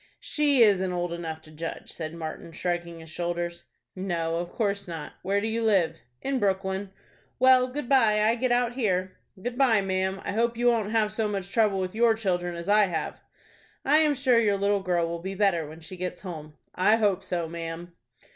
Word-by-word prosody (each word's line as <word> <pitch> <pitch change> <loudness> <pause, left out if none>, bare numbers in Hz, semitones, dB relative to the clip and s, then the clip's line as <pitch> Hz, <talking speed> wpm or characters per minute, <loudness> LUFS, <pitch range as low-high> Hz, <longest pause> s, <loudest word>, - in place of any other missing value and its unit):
"She 285 -5 +3
isn't 190 -4 +3
old 175 -1 -2
enough 160 -2 -5
to 155 - -14
judge," 165 +2 -6
said 160 0 -5
Martin, 165 0 -6
shrugging 170 -1 -3
his 160 - -10
shoulders. 175 0 -3 0.3
"No, 170 -3 -2
of 175 +1 -4
course 200 -3 -1
not. 165 -3 -6
Where 200 +2 +1
do 205 - -3
you 225 +1 -1
live?" 195 -7 +2 0.2
"In 270 -1 0
Brooklyn." 190 -1 -1 0.5
"Well, 255 0 +6
good 260 0 -5
by; 220 -6 +4
I 220 +2 +4
get 250 +1 0
out 245 0 +2
here." 185 -7 -1 0.2
"Good 245 +6 -5
by, 235 -6 +5
ma'am. 190 0 -1
I - - -2
hope 230 +2 0
you 240 0 +4
won't 225 -3 +1
have 215 -1 +1
so 215 0 -1
much 195 -2 -4
trouble 215 -4 +3
with 185 -1 -2
your 230 0 +4
children 175 -5 -1
as 170 +1 -7
I 210 0 +5
have." 170 -3 -4 0.6
"I 295 +3 +5
am 305 -2 +3
sure 255 -3 +3
your 205 -3 +2
little 200 0 +1
girl 175 -3 +1
will 170 0 -4
be 190 +2 -5
better 185 -6 +2
when 160 +2 -11
she 165 +3 -9
gets 180 0 -4
home." 155 -5 -8 0.2
"I 190 +4 +4
hope 200 -4 +1
so, 175 -3 -2
ma'am." 165 +1 -6
195 Hz, 205 wpm, -27 LUFS, 175-225 Hz, 0.6 s, Well